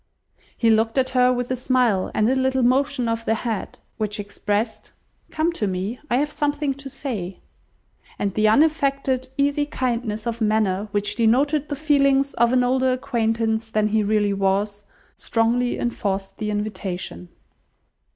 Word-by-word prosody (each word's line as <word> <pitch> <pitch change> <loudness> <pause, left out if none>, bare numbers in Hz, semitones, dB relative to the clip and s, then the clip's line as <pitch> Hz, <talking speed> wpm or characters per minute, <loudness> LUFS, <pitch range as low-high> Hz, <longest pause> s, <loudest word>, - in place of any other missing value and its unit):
He 230 -1 +3
looked 225 +2 +2
at 260 -1 +2
her 250 0 +4
with 245 0 -2
a - - +1
smile, 250 -6 +1
and 215 - +3
a 255 - +3
little 260 0 +1
motion 260 0 +2
of 230 0 -1
the 225 - +1
head, 225 -2 -4 0.2
which 210 0 -3
expressed, 205 +2 -3 0.4
"Come 315 +2 0
to 220 -11 -2
me, 190 +6 -3
I 240 - +2
have 295 +2 0
something 290 -1 -1
to 275 0 -9
say;" 225 -9 -5 0.8
and 200 -2 -1
the 215 +1 +2
unaffected, 275 0 +2
easy 285 +1 +1
kindness 235 -6 -2
of 235 0 -3
manner 210 -2 +1
which 205 +2 -1
denoted 275 +6 +2
the 290 - -2
feelings 275 -2 +2
of 235 0 +2
an 255 -1 +3
older 260 +1 +2
acquaintance 225 -3 -1
than 215 -1 +1
he 220 +1 +2
really 205 -1 +1
was, 200 +1 0 0.3
strongly 240 +2 0
enforced 200 -5 -3
the 215 - -2
invitation. 190 - -4
235 Hz, 155 wpm, -23 LUFS, 210-265 Hz, 0.8 s, her